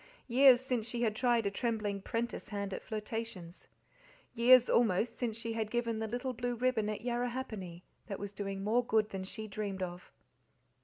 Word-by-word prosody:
Years 260 0 +7
since 250 -4 -2
she 240 0 -2
had 215 -2 +1
tried 240 -2 +2
a 200 - +1
trembling 210 -3 -1
'prentice 235 +3 -3
hand 200 -2 -3
at - - -4
flirtations. 215 -5 -6 0.7
Years, 245 +1 +7
almost, 230 0 +2
since 230 -3 -2
she 230 0 -4
had 220 -1 -2
given 230 -1 -1
the 220 - -2
little 245 +3 -3
blue 245 0 -2
ribbon 235 -3 +1
at 215 - -3
Yarrahappini, 240 -7 -3 0.2
that 200 -3 -4
was 200 -1 -5
doing 195 -1 -4
more 230 +4 +2
good 220 -2 +2
than 195 -2 -5
she 215 +3 -6
dreamed 200 -2 -3
of. 180 0 -7
225 Hz, 175 wpm, -33 LUFS, 205-240 Hz, 0.7 s, Years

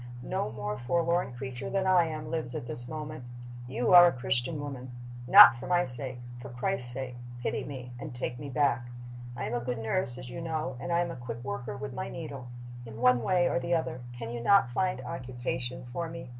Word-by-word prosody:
No 105 - -2
more 105 -1 -4
forlorn 170 +4 0
creature 125 0 -6
than 195 -1 0
I 185 -2 +5
am 155 -1 -5
lives 155 -7 -3
at - - -4
this 120 0 -4
moment. 155 -3 -6 0.4
You 120 +5 +1
are 175 0 +11
a - - +3
Christian 125 +3 0
woman. 135 -3 -6 0.4
Not 195 -6 +10
for 135 - -7
my 175 -1 +3
sake 125 -1 0 0.2
for - - -8
Christ's 125 0 0
sake 125 0 -5 0.3
pity - - -1
me 125 -3 -7
and 125 - -7
take 120 0 -4
me 145 - -6
back. 125 -3 +1 0.5
"I - - -3
am 110 - -3
a 120 - 0
good 120 0 -3
nurse, 120 +3 0
as 130 -1 -7
you 170 - -6
know, 155 -5 -3
and 175 - -4
I 170 0 +3
am 170 -1 -2
a - - -6
quick 120 -1 -7
worker 105 -1 -4
with 135 -1 -6
my - - -4
needle. 140 -6 -7 0.4
In 115 -1 -9
one 125 0 +4
way 180 +2 +2
or - - +1
the 170 0 0
other 145 -6 -2 0.2
can 115 -1 -5
you 120 0 -4
not 195 -3 +4
find 180 -1 0
occupation 125 0 -4
for 170 +2 -3
me? 165 -6 -8
130 Hz, 215 wpm, -29 LUFS, 120-165 Hz, 0.5 s, are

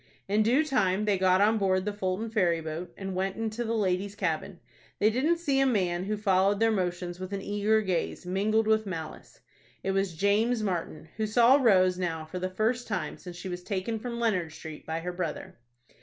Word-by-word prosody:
In 205 +2 +2
due 250 +8 +3
time 210 -8 +1
they 200 -3 +1
got 185 0 +4
on 215 +2 +4
board 185 -1 +1
the 210 - -2
Fulton 205 +2 -2
ferry 180 -7 +2
boat, 160 +2 -6
and 195 -1 -5
went 190 +1 -1
into 225 +1 -3
the 230 0 -1
ladies' 200 -1 0
cabin. 180 -1 -2 0.4
They 215 +2 +3
didn't 295 +9 +2
see 285 -5 0
a 270 - +4
man 185 -6 0
who 210 +1 -2
followed 195 -1 +2
their 225 0 +3
motions 180 -3 -2
with 185 +1 -6
an 195 - -3
eager 210 +1 +1
gaze, 180 -1 -2
mingled 210 +4 +1
with 220 -1 +2
malice. 160 -4 -7 0.4
It 195 - 0
was 195 -3 0
James 215 +6 +2
Martin, 170 -5 -3
who 220 -1 0
saw 240 +5 +6
Rose 185 -6 +4
now 165 -3 -2
for 180 +4 -6
the 185 +1 -2
first 220 +6 -1
time 195 -5 -3
since 175 -1 -9
she 180 - -7
was 180 -1 -5
taken 200 +4 -3
from 235 +1 -5
Leonard 185 -9 0
Street 155 -1 -10
by 160 +1 -2
her 180 +1 -4
brother. 170 -8 -5
195 Hz, 205 wpm, -28 LUFS, 180-220 Hz, 0.4 s, saw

